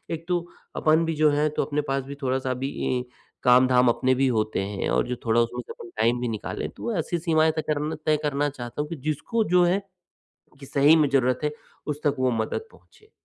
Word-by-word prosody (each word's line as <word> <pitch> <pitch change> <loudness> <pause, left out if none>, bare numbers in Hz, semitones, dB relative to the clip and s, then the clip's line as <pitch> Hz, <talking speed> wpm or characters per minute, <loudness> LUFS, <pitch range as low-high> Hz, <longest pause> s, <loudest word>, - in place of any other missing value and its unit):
एक 165 0 -4
तो 180 - +2 0.4
अपन 160 +1 +3
भी 165 0 -1
जो 155 0 +4
हैं 150 +1 +2
तो - - +1
अपने 150 0 -1
पास 135 0 0
भी 140 +1 -7
थोड़ा-सा 130 0 -1
ए, 130 - +1
भी 130 -1 -2 0.4
काम-धाम 125 0 +5
अपने 130 +2 +2
भी 135 +1 +2
होते 110 -2 -1
हैं 100 -1 -3
और - - +1
जो 125 - -2
थोड़ा 115 0 +3
उसमें 120 +1 -1
से - - -9
अपन 115 - -12
टाइम 120 +2 +2
भी 125 - -1
निकालें 110 -2 -4
तो 235 - -3
ऐसी 170 +2 -1
सीमाएँ 160 -1 +2
तय 155 - 0
करन 150 +1 -2
तय 155 - +4
करना 145 -1 0
चाहता 130 +1 -5
हूँ 150 - -6
कि 165 - -5
जिसको 220 - 0
जो 180 - +6
है 185 +3 +2 0.8
कि 135 - -10
सही 145 +4 +5
में 150 -2 +3
ज़रूरत 130 -2 +2
है 150 - 0 0.4
उस 145 - -11
तक 145 -2 +1
वो 130 0 +2
मदद 115 - -2
पहुँचे। 430 -1 -23
140 Hz, 225 wpm, -25 LUFS, 125-155 Hz, 0.8 s, जो